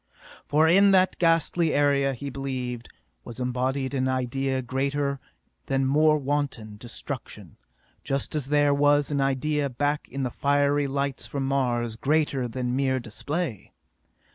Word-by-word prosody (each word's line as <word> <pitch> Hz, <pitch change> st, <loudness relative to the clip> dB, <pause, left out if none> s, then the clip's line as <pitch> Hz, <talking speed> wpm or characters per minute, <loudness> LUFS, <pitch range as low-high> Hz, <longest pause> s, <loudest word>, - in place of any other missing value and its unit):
For 155 Hz, +2 st, +4 dB
in 195 Hz, +4 st, +6 dB
that 185 Hz, 0 st, +1 dB
ghastly 165 Hz, -1 st, +2 dB
area, 140 Hz, -1 st, +2 dB
he 140 Hz, +3 st, -6 dB
believed, 125 Hz, -3 st, -4 dB, 0.3 s
was 120 Hz, +1 st, -9 dB
embodied 130 Hz, +2 st, -1 dB
an 130 Hz, -1 st, 0 dB
idea 130 Hz, +1 st, -1 dB
greater 140 Hz, +2 st, -1 dB, 0.5 s
than 135 Hz, -1 st, +1 dB
mere 155 Hz, +3 st, +4 dB
wanton 135 Hz, -7 st, -3 dB
destruction, 120 Hz, +2 st, -7 dB, 0.5 s
just 135 Hz, -1 st, -2 dB
as 150 Hz, -4 st, -1 dB
there 145 Hz, 0 st, +3 dB
was 145 Hz, +1 st, +3 dB
an 140 Hz, -1 st, +1 dB
idea 140 Hz, +2 st, 0 dB
back 145 Hz, +4 st, -2 dB
of 135 Hz, +1 st, -3 dB
the 125 Hz, -, -2 dB
fiery 145 Hz, 0 st, +1 dB
lights 140 Hz, 0 st, -2 dB
from 140 Hz, -1 st, -3 dB
Mars 120 Hz, -4 st, 0 dB
greater 140 Hz, -2 st, +1 dB
than 125 Hz, +1 st, -3 dB
mere 130 Hz, -1 st, +1 dB
display. 130 Hz, -, -4 dB
140 Hz, 140 wpm, -26 LUFS, 130-145 Hz, 0.5 s, in